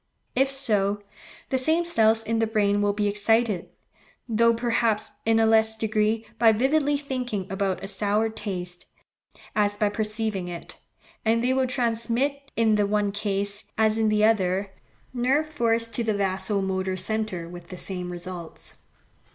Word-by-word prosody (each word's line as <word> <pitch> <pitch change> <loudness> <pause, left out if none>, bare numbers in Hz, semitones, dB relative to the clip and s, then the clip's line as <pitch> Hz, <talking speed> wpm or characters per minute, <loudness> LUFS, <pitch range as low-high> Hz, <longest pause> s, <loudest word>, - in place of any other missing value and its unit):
If 270 +2 +3
so, 210 -7 +1 0.5
the 260 - +2
same 320 +6 +2
cells 225 -8 +3
in 225 0 -1
the 225 - +2
brain 205 -2 +1
will 205 0 +2
be 205 0 0
excited, 210 -1 +1 0.6
though, 230 0 +4
perhaps, 230 -2 0 0.2
in 225 0 +4
a 225 - +4
less 220 0 +3
degree, 220 0 0
by 225 -1 +6
vividly 285 +5 +2
thinking 250 -8 -3
about 195 -1 -1
a - - -4
sour 210 +2 +1
taste, 180 -5 -5 0.7
as 205 -1 +2
by 205 0 +1
perceiving 215 -3 -2
it; 175 -1 -8 0.5
and 230 +1 +2
they 255 +1 +2
will 260 0 +1
transmit 250 +3 -1
in 225 -1 +3
the 205 -1 +2
one 205 0 +1
case, 205 0 -1
as 220 0 +2
in 220 -1 +3
the 215 0 +3
other, 195 -2 +1 0.4
nerve 260 +5 +1
force 230 -6 +1
to 235 - -2
the 220 -2 0
vaso 195 +1 0
motor 190 -1 -2
centre 190 -3 -3
with 175 0 -10
the 180 - -9
same 180 -1 -4
results. 175 -1 -8
215 Hz, 160 wpm, -25 LUFS, 200-230 Hz, 0.7 s, by